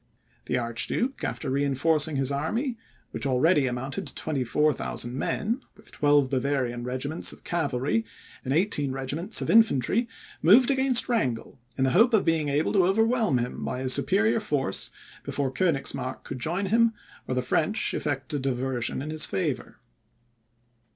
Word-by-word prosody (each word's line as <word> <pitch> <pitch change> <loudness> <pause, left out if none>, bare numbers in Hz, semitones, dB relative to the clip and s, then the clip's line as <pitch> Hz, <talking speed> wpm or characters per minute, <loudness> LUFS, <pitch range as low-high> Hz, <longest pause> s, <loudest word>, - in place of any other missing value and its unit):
The - - 0
Archduke, 120 - -2
after 140 - -3
reinforcing 145 +3 +1
his 135 0 +1
army, 225 - -2 0.4
which - - -2
already 135 +2 +3
amounted 130 +2 -4
to - - -9
24,000 140 -3 -1
men, 220 - -2 0.2
with - - -16
twelve 145 -2 +3
Bavarian 130 -2 -1
regiments 130 +6 -1
of - - -15
cavalry, 145 - -1 0.4
and 130 - -4
eighteen 150 -4 +1
regiments 145 - 0
of - - -5
infantry, 225 - +3 0.3
moved 240 - +6
against 265 -2 +3
Wrangel, 130 - -2 0.2
in 130 - +1
the 130 - +2
hope 225 +6 +5
of 205 - +2
being 160 -3 +1
able 145 +2 0
to 190 -4 +4
overwhelm 225 - +2
him 120 0 -4
by 125 - -3
his 130 -1 +3
superior 220 +4 +2
force 145 - -1 0.3
before 140 -2 -2
Koenigsmark 135 -5 -1
could 130 - -7
join 175 +9 -1
him, 225 +3 +3 0.3
or 130 - -2
the 125 - 0
French 165 - +1
effect 145 -1 -3
a 145 - 0
diversion 130 -1 -2
in 155 - -5
his 155 -1 +1
favour. 95 -1 -3
145 Hz, 150 wpm, -26 LUFS, 130-195 Hz, 0.4 s, moved